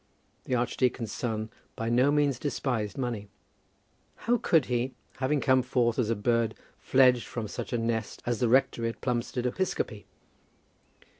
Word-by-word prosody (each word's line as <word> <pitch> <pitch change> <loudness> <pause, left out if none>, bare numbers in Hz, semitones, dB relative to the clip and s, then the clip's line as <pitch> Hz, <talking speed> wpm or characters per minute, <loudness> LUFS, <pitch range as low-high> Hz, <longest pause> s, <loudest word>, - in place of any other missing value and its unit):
The 130 - 0
archdeacon's 125 -1 0
son 110 -2 -3 0.2
by 115 - -3
no 125 +4 +4
means 145 -3 +2
despised 125 -8 -2
money. 120 -6 -3 1.0
How 240 +1 +3
could 160 -9 +3
he, 125 +1 -1 0.2
having 140 +3 +1
come 130 -1 +4
forth 125 -1 +1
as 115 -3 +1
a 115 - +2
bird 115 +1 +1 0.2
fledged 125 -2 +4
from 115 -3 -4
such - - -6
a 120 - +1
nest 115 -1 -2
as 120 -2 -1
the 120 - +2
rectory 115 -2 +3
at 115 - -9
Plumstead 125 0 -1
Episcopi? 125 - -2
120 Hz, 150 wpm, -28 LUFS, 115-130 Hz, 1.0 s, no